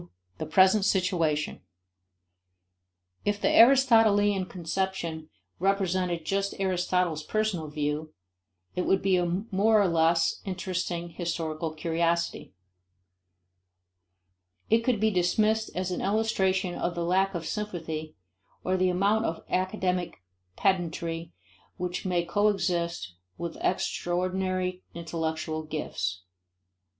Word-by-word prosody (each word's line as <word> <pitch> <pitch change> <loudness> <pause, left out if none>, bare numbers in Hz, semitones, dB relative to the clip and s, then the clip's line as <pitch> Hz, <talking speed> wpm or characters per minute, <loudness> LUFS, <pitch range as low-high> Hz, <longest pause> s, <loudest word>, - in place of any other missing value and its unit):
The - - -3
Present 190 +5 +5
Situation. 175 -6 +1 1.6
If 205 0 0
the - - +2
Aristotelian 225 -6 +5
conception 170 -3 -3 0.3
represented 185 -3 0
just 195 +2 -1
Aristotle's 180 -3 0
personal 195 -2 -1
view, 150 +1 -3 0.6
it 180 - -1
would 190 - +2
be 190 -1 +3
a 180 +3 -1
more 215 +3 +4
or 200 - +4
less 165 0 +2
interesting 180 -2 -3
historical 165 -2 -3
curiosity. 170 - -1 2.2
It 225 - +6
could 245 -3 +1
be 220 +1 +3
dismissed 215 +4 +2
as 185 0 -2
an 180 - -2
illustration 190 -3 +1
of 175 - -2
the 170 0 -2
lack 190 +2 +2
of 165 -1 -4
sympathy 160 -7 -4 0.5
or 185 +1 +1
the 185 0 +2
amount 200 +5 +2
of 165 - -3
academic 185 - -1 0.3
pedantry 170 -3 -1 0.5
which 180 +1 -3
may 175 -2 +1
coexist 175 - 0 0.2
with 170 -1 -5
extraordinary 185 +1 -1
intellectual 160 -1 -3
gifts. 95 -13 -4
180 Hz, 105 wpm, -28 LUFS, 165-195 Hz, 2.2 s, It